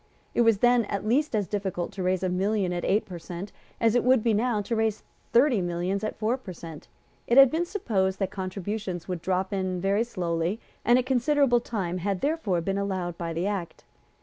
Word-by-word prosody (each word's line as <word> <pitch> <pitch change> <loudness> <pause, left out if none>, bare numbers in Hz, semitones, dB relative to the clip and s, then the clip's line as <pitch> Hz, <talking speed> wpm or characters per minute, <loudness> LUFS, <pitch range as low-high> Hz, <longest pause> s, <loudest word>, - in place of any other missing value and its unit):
It - - +2
was 230 -3 +4
then 240 -2 +4
at 200 0 -3
least 275 +3 +2
as 205 -3 0
difficult 190 -4 -3
to 195 -1 -6
raise 185 0 0
a 185 - +1
million 190 0 0
at 175 - -3
eight 205 +3 +2
per 180 -3 -8
cent. 175 +4 -7 0.3
as 225 -1 +3
it 245 - +3
would 255 -2 +3
now 225 0 +2
be - - -2
to 230 +3 -2
raise 220 -1 0 0.3
thirty 240 -3 +4
millions 175 +3 -2
at 215 - -3
four 225 +4 0
per 205 -8 -9
cent. 165 -2 -10 0.4
It 240 - +3
had 275 -2 +9
been 335 +2 0
supposed 195 - 0
that 195 -1 -2
contributions 190 -1 -4
would 180 -3 -4
drop 190 +2 -1
in 185 -2 -1
very 200 +4 +2
slowly; 175 -2 -2 0.2
and 240 +1 +5
a 255 - +2
considerable 260 0 +3
time 185 -7 -3
had 195 +1 -2
therefore 280 - 0
been 195 +3 -1
allowed 185 -3 -2
by 170 -1 -3
the 165 +3 -2
Act. 195 -4 -4
200 Hz, 210 wpm, -27 LUFS, 180-235 Hz, 0.4 s, had